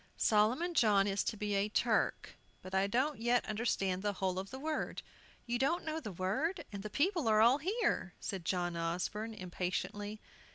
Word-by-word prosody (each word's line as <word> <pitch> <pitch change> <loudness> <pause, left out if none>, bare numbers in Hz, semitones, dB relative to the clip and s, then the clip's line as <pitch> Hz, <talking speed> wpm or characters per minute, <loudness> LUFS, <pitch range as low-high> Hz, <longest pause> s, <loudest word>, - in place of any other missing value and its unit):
Solomon 235 +12 +3
John 210 -9 +4
is 200 0 0
to 220 - -2
be 210 0 -2
a 200 +1 +1
Turk, - - +1 0.3
but 185 - -9
I 190 +1 +3
don't 260 +7 0
yet 240 +1 +2
understand 205 -4 0
the 205 0 0
whole 185 -1 -1
of 195 +1 -6
the 260 - -7
word." 305 +3 -3 0.4
"You 240 0 -1
don't 320 +7 +1
know 315 0 -2
the 215 -10 -6
word, 215 - -1
and 200 -1 -5
the 215 - -5
people 335 - +1
are 215 -1 +5
all 240 +6 +6
here!" 375 - 0
said 190 -3 -4
John 175 0 -1
Osborne, 180 +7 -2
impatiently. 200 +3 -3
210 Hz, 180 wpm, -34 LUFS, 190-260 Hz, 0.4 s, all